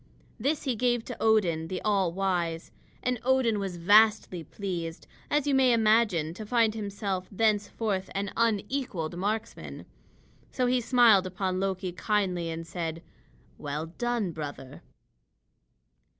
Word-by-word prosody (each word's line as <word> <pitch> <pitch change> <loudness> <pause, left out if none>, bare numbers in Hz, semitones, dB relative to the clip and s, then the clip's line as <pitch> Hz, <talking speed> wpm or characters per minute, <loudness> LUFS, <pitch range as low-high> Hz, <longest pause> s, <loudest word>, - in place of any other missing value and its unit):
This 285 +6 0
he 260 -3 -1
gave 240 0 +1
to 245 - -7
Odin, 180 -8 +2
the 185 - -3
all 195 -5 +2
wise. 175 -3 -2 0.3
And 250 -1 0
Odin 250 -4 +2
was 190 -3 -4
vastly 205 -1 +4
pleased, 170 -2 -5 0.2
as 295 -1 +1
you 285 - +1
may 260 -2 +5
imagine, 215 -8 +3
to 215 - -7
find 225 0 +2
himself 200 -3 -3
thenceforth 205 -1 0
an 200 0 -2
unequaled 215 - -1
marksman. 215 +5 -4 0.7
So 255 - 0
he 250 0 +2
smiled 230 -6 +5
upon 185 0 -2
Loki 190 -1 -2
kindly 180 -3 -1
and 165 0 -5
said: 165 -1 -5 0.6
"Well 150 +3 -5
done, 240 -6 0
brother." 145 -4 -7
200 Hz, 130 wpm, -28 LUFS, 175-230 Hz, 0.7 s, may